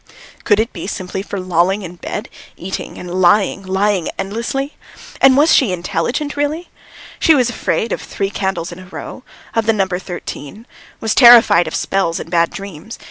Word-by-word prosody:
Could 205 -1 +4
it 225 +2 0 0.2
simply 190 -1 -4
be - - -12
for 200 - -4
lolling 185 +2 +1
in 175 -1 -9
bed, 210 +5 -5 0.3
eating 190 +2 -6
and 180 +1 -4
lying, 195 +2 +3
lying 190 -1 0
endlessly? 235 +8 -3 0.5
And 270 -1 +6
was 300 +3 +5
she 255 -8 +4
intelligent 185 - -2
really? 295 +4 -2 0.5
She 320 - +5
was 250 -3 +2
afraid 225 -1 -1
of - - -2
three 195 0 -3
candles 190 -5 -2
in 175 - -9
a 185 - -12
row, 225 - -8 0.3
of 225 -1 0
the 225 - +4
number 190 -3 -1
thirteen, 180 +2 -8 0.3
was 220 - 0
terrified 235 -8 +7
of - - -4
spells 190 -4 0
and 165 - -8
bad 170 -1 +3
dreams. 195 +2 -9
195 Hz, 175 wpm, -17 LUFS, 180-230 Hz, 0.5 s, terrified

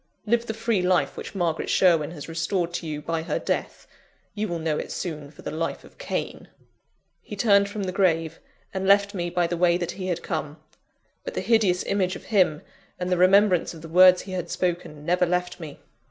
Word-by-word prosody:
Live 235 +2 +1
the 220 - -3
free 225 -3 0
life 180 0 +1
which - - -8
Margaret 170 -4 -1
Sherwin 165 -6 +3
has 160 -4 -9
restored 170 +1 -2
to 175 -1 -4
you 150 -1 -5
by 165 -1 -2
her 160 - -2
death - - -3 0.5
you 215 0 -2
will 175 - -3
know 160 -2 -1
it - - -6
soon 150 -5 -5
for 155 - -16
the - - -4
life 165 +1 -3
of - - -18
Cain!" - - -4 0.7
He 210 - -8
turned 200 -1 +4
from 205 0 -4
the 185 - -2
grave, 165 -4 +1 0.3
and 190 0 -2
left 200 +1 +4
me 175 -3 -2
by 175 0 +1
the 175 +1 -2
way 175 0 +3
that 175 -2 -3
he 185 -1 -6
had 175 -2 -2
come; 150 +1 -4 0.7
but - - -6
the - - -1
hideous 210 -6 +2
image 190 -2 0
of - - -9
him, 175 -7 +3 0.4
and 180 0 -3
the 180 - +2
remembrance 185 -1 +4
of 160 - -12
the - - -7
words 180 +2 +6
he 195 - -9
had 180 -2 -4
spoken, 170 -4 -3
never 180 +1 +2
left 180 +1 -1
me. 155 -4 -8
180 Hz, 210 wpm, -25 LUFS, 165-195 Hz, 0.7 s, words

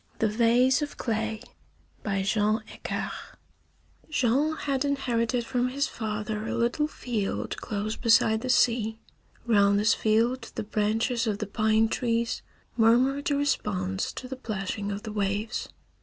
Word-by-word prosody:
THE 220 - +2
VASE 240 +5 +3
OF 295 - -4
CLAY 220 -1 -2 0.6
BY 195 -2 -1
JEAN 210 +2 +1
AICARD - - -4
I - - -10 0.7
Jean 290 +2 +2
had 275 -3 -1
inherited 245 -4 0
from 250 0 0
his 280 +3 0
father 215 -2 -4
a - - -2
little 240 +6 +1
field 230 -8 -3
close 215 0 -3
beside 225 -1 +4
the 255 - -4
sea. 230 -3 +3 0.5
Round 200 -3 +4
this 210 +2 +4
field 230 +4 +1
the - - -2
branches 225 +3 0
of 210 -2 0
the 210 - -3
pine 220 +2 +2
trees 230 0 -1 0.3
murmured 250 +5 +3
a 285 - +2
response 195 -9 -1
to 255 - -7
the 265 - -5
plashing 205 -4 -4
of 200 +1 -5
the 215 - -5
waves. 205 +1 -2
225 Hz, 145 wpm, -27 LUFS, 210-250 Hz, 0.7 s, beside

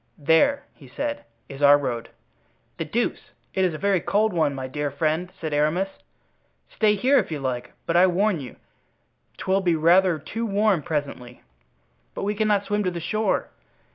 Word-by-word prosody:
"There," 165 - +3
he - - -16
said, 290 0 -4 0.2
"is 135 +1 -10
our 145 0 +7
road." 120 -5 -4 0.7
"The - - -3
deuce! - - -2 0.2
it 190 - +1
is 180 -4 +1
a - - -4
very 195 +1 +1
cold 210 +4 +1
one, 155 -5 +1
my 130 -1 -5
dear 145 +2 -3
friend," 155 +5 -1
said 155 -2 -4
Aramis. 155 +6 +1 0.8
"Stay 210 -1 +3
here, 260 +7 +3
if - - -3
you 150 - -3
like, 125 -2 -4
but 165 - -1
I 180 +2 +6
warn 190 0 +1
you 130 -4 -9 0.8
'twill 190 +1 0
be 175 -3 +2
rather 170 +2 +4
too 225 +10 -4
warm 205 -3 +2
presently." 140 -5 -5 0.7
"But - - -4
we 205 +1 0
cannot 210 -1 +1
swim 205 0 0
to - - +2
the 175 -1 -5
shore." 215 +6 -1
175 Hz, 175 wpm, -24 LUFS, 145-205 Hz, 0.8 s, our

